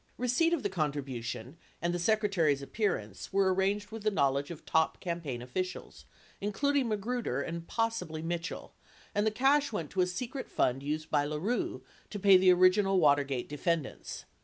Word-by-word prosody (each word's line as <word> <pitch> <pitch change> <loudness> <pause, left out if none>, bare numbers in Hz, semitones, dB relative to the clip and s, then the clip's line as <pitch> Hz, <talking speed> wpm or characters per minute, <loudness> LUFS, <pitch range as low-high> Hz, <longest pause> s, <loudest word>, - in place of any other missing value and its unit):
Receipt 250 +7 +2
of 335 -7 0
the - - +2
contribution 140 -5 -3 0.2
and 170 0 -1
the 175 - -1
Secretary's 175 -8 +2
appearance 125 - -2
were 190 -1 +3
arranged 200 +2 0
with 225 0 -6
the 215 - +2
knowledge 140 -6 +1
of 170 -2 -9
top 160 0 +1
campaign 165 -9 -4
officials, 185 +9 -5 0.4
including 275 +6 +1
Ma 215 - +1
gruder 220 - -2
and 170 0 -5
possibly 225 -9 -2
Mitchell, 170 +1 -4 0.4
and 210 +1 +1
the - - +5
cash 270 +6 +3
went: 165 -9 -4
to 190 - +1
a 180 - +3
secret 245 +8 -5
fund 130 +1 +1
used 155 +2 -3
by 145 - +3
LaRue 155 +11 -2 0.3
to 205 - -5
pay 195 0 +7
the 185 0 +6
original 185 +2 +4
Watergate 140 -4 +2
defendants. 150 - -3
180 Hz, 165 wpm, -31 LUFS, 150-210 Hz, 0.4 s, pay